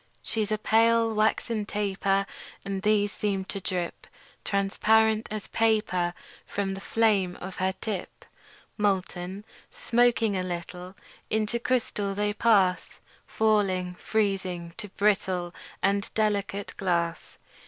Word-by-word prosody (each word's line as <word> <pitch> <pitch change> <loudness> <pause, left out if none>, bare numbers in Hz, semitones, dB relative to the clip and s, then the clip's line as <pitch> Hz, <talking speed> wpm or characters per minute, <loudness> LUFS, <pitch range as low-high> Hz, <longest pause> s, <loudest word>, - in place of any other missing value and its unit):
She's 215 -2 -2
a 215 - +2
pale, 225 +1 +3
waxen 215 +1 +1
taper; 195 -1 0 0.4
And 195 -1 -3
these 205 0 +2
seem 195 -3 -2
to 195 - -5
drip 180 -2 -4 0.4
Transparent 215 +2 +2
as 215 -1 -5
paper 210 -6 +1 0.3
From 195 -1 -2
the 195 - -7
flame 200 -6 +2
of 190 0 -8
her 190 0 +1
tip. 205 -5 -5 0.5
Molten, 190 -1 -1 0.2
smoking 235 -3 +2
a 185 - 0
little, 180 +1 -6 0.3
Into 220 +2 0
crystal 220 -5 -1
they 205 0 0
pass; 200 -5 +2 0.3
Falling, 195 -5 +1
freezing, 185 -4 -1
to 210 -3 -6
brittle 190 -3 0 0.3
And 200 +1 +1
delicate 205 -2 0
glass. 170 -3 -1
200 Hz, 115 wpm, -27 LUFS, 185-215 Hz, 0.5 s, pale